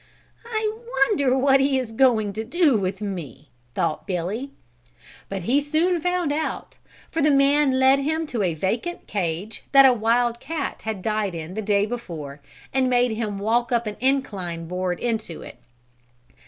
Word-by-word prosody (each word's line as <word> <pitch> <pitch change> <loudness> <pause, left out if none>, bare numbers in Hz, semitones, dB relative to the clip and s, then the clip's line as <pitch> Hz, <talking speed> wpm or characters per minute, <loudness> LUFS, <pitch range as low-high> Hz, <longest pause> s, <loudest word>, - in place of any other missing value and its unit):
"I 435 -2 -1 0.2
wonder 280 - +3
what 270 +1 +4
he 270 0 +2
is 250 -4 -3
going 225 -4 +3
to 220 +2 -3
do 295 +3 +2
with 195 -1 -2
me," 165 - -6 0.3
thought 165 -2 -1
Billy. 195 +8 -3 0.8
But 195 -2 -4
he 260 +9 +2
soon 325 +4 +1
found 355 -3 0
out, 310 +1 -4 0.3
for 325 - -1
the 300 - +4
man 280 -1 +4
led 265 +1 +5
him 315 +3 -1
to 245 -7 -3
a 175 -4 0
vacant 230 - -2
cage 190 +2 -3
that 275 -1 +9
a 260 - +7
wild 235 +1 +1
cat 285 +1 -4
had 215 -4 -4
died 215 -4 -1
in 165 +2 -6
the 220 - -3
day 205 -1 +2
before, 165 -12 -7 0.3
and 260 0 +2
made 245 -1 +3
him 215 -2 -3
walk 225 +4 0
up 235 -1 +1
an 210 -1 -4
inclined 200 -11 -1
board 180 0 -2
into 220 -8 -3
it. - - -11
235 Hz, 170 wpm, -23 LUFS, 195-275 Hz, 0.8 s, that